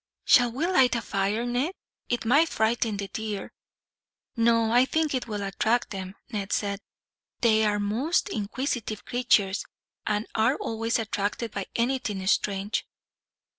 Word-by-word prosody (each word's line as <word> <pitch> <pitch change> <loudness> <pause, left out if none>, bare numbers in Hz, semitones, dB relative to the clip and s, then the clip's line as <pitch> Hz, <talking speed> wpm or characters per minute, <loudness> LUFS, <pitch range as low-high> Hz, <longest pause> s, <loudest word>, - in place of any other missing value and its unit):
"Shall 245 -1 +6
we 270 +8 -1
light 265 -10 +4
a 235 - -1
fire, 200 +4 -1
Ned? 250 +8 0 0.4
It 240 -2 -1
might 290 +8 +4
frighten 220 -1 0
the 200 0 -4
deer." 215 -4 -5 0.8
"No, 230 -1 +3
I 245 +1 +6
think 310 +2 0
it 255 -2 -2
will 210 -2 -3
attract 220 +4 0
them," 190 -1 -6 0.2
Ned 205 -3 -3
said. 200 -1 -1 0.6
"They 220 -2 +4
are 205 -1 +1
most 240 - 0
inquisitive 220 - -3
creatures, 220 -5 +2 0.4
and 210 +1 0
are 225 +5 +3
always 225 -2 -1
attracted 220 0 -2
by 200 -2 -4
anything 230 -6 -1
strange." 200 +1 0
225 Hz, 140 wpm, -27 LUFS, 205-245 Hz, 0.8 s, Shall